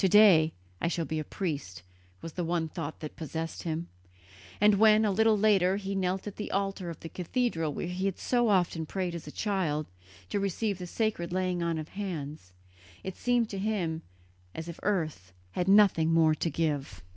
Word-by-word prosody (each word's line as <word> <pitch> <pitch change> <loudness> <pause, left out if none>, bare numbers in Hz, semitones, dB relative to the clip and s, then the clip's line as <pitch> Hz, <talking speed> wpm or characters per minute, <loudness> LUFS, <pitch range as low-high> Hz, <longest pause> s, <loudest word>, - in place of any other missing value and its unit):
"To 190 - +4
day 180 -6 +7 0.3
I - - +1
shall 170 -1 -1
be 155 0 -2
a - - -2
priest," 140 - -4 0.4
was 165 - -6
the 180 - -2
one 165 -1 0
thought 160 -1 -6
that 155 - -6
possessed 160 +1 -4
him; 165 0 -3 0.7
and 210 -1 +5
when, 215 0 +6
a 205 - +2
little 220 +2 +4
later, 195 -3 +4
he 200 -1 -4
knelt 190 -1 -1
at 205 - -7
the 210 - -4
altar 195 -2 -1
of 165 - -8
the - - -6
cathedral 175 - -1
where - - -4
he 180 +2 -3
had 195 - -2
so 240 -2 +2
often 175 -5 +1
prayed 185 -1 -2
as 165 -3 -7
a - - -6
child, 170 -8 -1 0.4
to - - 0
receive 200 +1 -1
the 180 - -5
sacred 205 -4 -1
laying 185 -1 0
on 170 -1 0
of 155 0 -5
hands, 155 - -5 0.5
it 190 - -5
seemed 245 -2 +2
to 195 - -4
him 185 -6 -1 0.5
as 160 +1 -5
if 170 - -7
earth 155 - -1 0.2
had 180 - -1
nothing 195 -5 +5
more 160 -1 +5
to 160 +2 -1
give. 145 - -2
175 Hz, 195 wpm, -29 LUFS, 160-200 Hz, 0.7 s, day